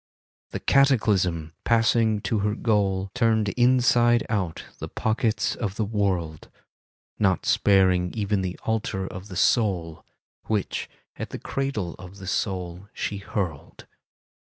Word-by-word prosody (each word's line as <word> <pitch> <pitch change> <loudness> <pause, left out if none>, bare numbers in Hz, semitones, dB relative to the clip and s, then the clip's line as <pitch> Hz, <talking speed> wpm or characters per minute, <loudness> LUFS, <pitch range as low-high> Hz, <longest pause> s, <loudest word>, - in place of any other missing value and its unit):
The - - -4
Cataclysm, 100 - +2
passing 115 -2 +3
to 110 -1 0
her 105 +1 0
goal. 100 -4 0
Turned 110 -4 +2
inside 120 -1 +3
out 95 -7 -2 0.2
the - - -5
pockets 110 0 0
of 105 -4 -3
the 110 - -1
world, 95 -7 -2 0.7
Not 95 -4 +2
sparing 95 -3 +3
even 105 -2 0
the 90 -1 -3
altar 105 -3 -1
of 95 +1 -8
the 95 - -9
soul, 90 -8 +1 0.4
Which 105 -3 -2 0.3
at - - -5
the - - -6
cradle 135 -11 -3
of 90 +1 -11
the 95 - -9
soul 95 -1 -3
she 105 - -3
hurled. 95 -7 -5
100 Hz, 130 wpm, -25 LUFS, 95-110 Hz, 0.7 s, passing